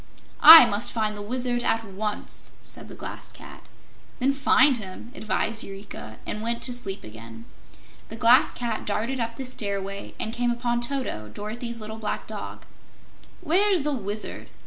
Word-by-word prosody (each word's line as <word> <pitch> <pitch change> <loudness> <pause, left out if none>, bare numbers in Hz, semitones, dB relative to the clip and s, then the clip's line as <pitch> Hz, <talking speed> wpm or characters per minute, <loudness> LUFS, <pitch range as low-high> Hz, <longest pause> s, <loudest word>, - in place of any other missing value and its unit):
"I 320 -2 +12
must 215 0 +1
find 215 -2 -1
the 205 - -7
Wizard 245 +2 -2
at 225 -1 0
once!" 210 +1 -5
said - - -10
the - - -10
Glass - - -8
Cat. - - -13 0.5
"Then 270 +2 +1
find 275 -1 +4
him," 205 +2 -9
advised 220 -2 -2
Eureka, 195 - -9
and 210 - -3
went 235 +1 -2
to 250 - -2
sleep 200 -5 -3
again. 115 +1 -11 0.6
The 225 - -6
Glass 235 +2 +5
Cat 235 -3 -4
darted 230 +6 -1
up 230 0 -3
the 265 - -6
stairway 200 -5 -4
and 220 - -3
came 240 0 0
upon 240 0 -1
Toto, 240 - -3
Dorothy's 230 - -6
little 215 0 -6
black 215 - -4
dog. - - -8 0.8
"Where's 360 +1 +2
the 295 0 -1
Wizard?" 210 -3 -5
230 Hz, 160 wpm, -25 LUFS, 205-245 Hz, 0.8 s, I